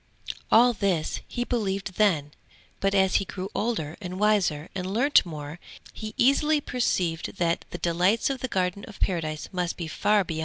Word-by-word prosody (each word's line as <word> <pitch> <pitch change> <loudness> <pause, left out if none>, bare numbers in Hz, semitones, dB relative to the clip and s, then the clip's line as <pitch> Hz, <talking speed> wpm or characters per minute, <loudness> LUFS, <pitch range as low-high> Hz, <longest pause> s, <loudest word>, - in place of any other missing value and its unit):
All 240 +2 +6
this 190 -7 -1
he 240 - -2
believed 195 -5 -2
then; 160 -9 +2 0.5
but 195 0 +1
as 190 -1 +4
he - - 0
grew 190 +2 -6
older 190 -9 -2
and 185 -1 -6
wiser 195 -8 +2
and 185 -1 -4
learnt 265 +8 +4
more, 150 0 -7 0.3
he 215 -1 -7
easily 295 +4 +4
perceived 185 - -1
that 170 -1 0
the - - -6
delights 180 +9 +2
of 265 - -4
the 255 - -2
Garden 185 -2 -1
of 210 - -12
Paradise 155 -4 -2
must 180 -2 -2
be 170 - -4
far 205 +5 +2
beyond 170 - -6
all 160 - -3
this. - - -3
190 Hz, 185 wpm, -26 LUFS, 170-215 Hz, 0.5 s, All